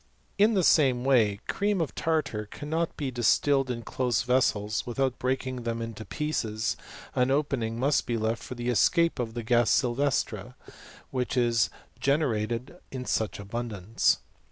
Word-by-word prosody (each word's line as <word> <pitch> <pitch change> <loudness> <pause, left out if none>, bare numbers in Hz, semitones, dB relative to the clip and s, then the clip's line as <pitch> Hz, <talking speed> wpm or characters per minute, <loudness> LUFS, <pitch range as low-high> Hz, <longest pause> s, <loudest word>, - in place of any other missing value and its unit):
* - - -38
In 220 0 +2
the 190 - +3
same 130 -6 +4
way 110 -6 +3
cream 205 -1 0
of 160 -5 -1
tartar 155 -10 -1
cannot 160 +8 -3
be 140 -4 -2
distilled 130 +3 +2
in 115 -2 -3
close 125 -1 0
vessels 110 -4 +1
without 130 +1 -1
breaking 130 0 -1
them 115 0 -3
in 115 0 -4
pieces, 110 +1 -2 0.4
an 125 0 +2
opening 135 -5 0
must 140 +3 +2
be 120 - 0
left 110 +1 -1
for. 125 - -7
the 120 0 -3
escape 170 +7 +3
of 115 -2 -3
the 120 - -3
ga^ 120 0 +3
sylvestre 130 +4 0
y - - -14 0.4
which 130 -1 -2
is 120 -2 +3 0.3
gene 140 +3 +2
rated 120 +6 -2
in 130 -1 -6
such 110 -4 -1
abundance. 105 0 0
125 Hz, 160 wpm, -28 LUFS, 115-140 Hz, 0.4 s, same